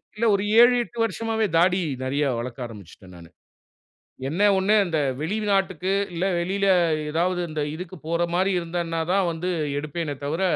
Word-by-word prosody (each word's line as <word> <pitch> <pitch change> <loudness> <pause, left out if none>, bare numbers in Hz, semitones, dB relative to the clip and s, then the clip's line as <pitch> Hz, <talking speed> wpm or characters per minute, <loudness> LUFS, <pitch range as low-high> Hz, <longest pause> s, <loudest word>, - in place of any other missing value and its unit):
இல்ல 225 +2 -1
ஒரு 195 - -1 0.2
7-8 240 -1 +3
வருஷமாவே 225 -1 -1
தாடி 180 +2 +3 0.2
நறைய 140 +3 0
வளர்க்க 125 +1 -5
ஆரம்பிச்சுட்டேன் 100 -4 -12
நானு. 85 -1 -13 1.0
என்ன 170 +7 -2 0.2
ஒண்ணு 190 +3 +2
அந்த 165 -3 -1 0.2
வெளிநாட்டுக்கு, 195 -1 0 0.2
இல்ல 170 +2 -1
வெளில 195 +3 -1 0.5
ஏதாவது 175 +3 0
இந்த 155 -1 -3
இதுக்கு 180 +2 -8
போற 170 +1 +1
மாரி 190 +2 +2
இருந்தேனா 170 -1 -3
தான் 195 -2 +2
வந்து 170 +3 -3 0.3
எடுப்பேனே 150 0 -4
தவுர, 160 +5 -2
175 Hz, 140 wpm, -24 LUFS, 155-195 Hz, 1.0 s, 7-8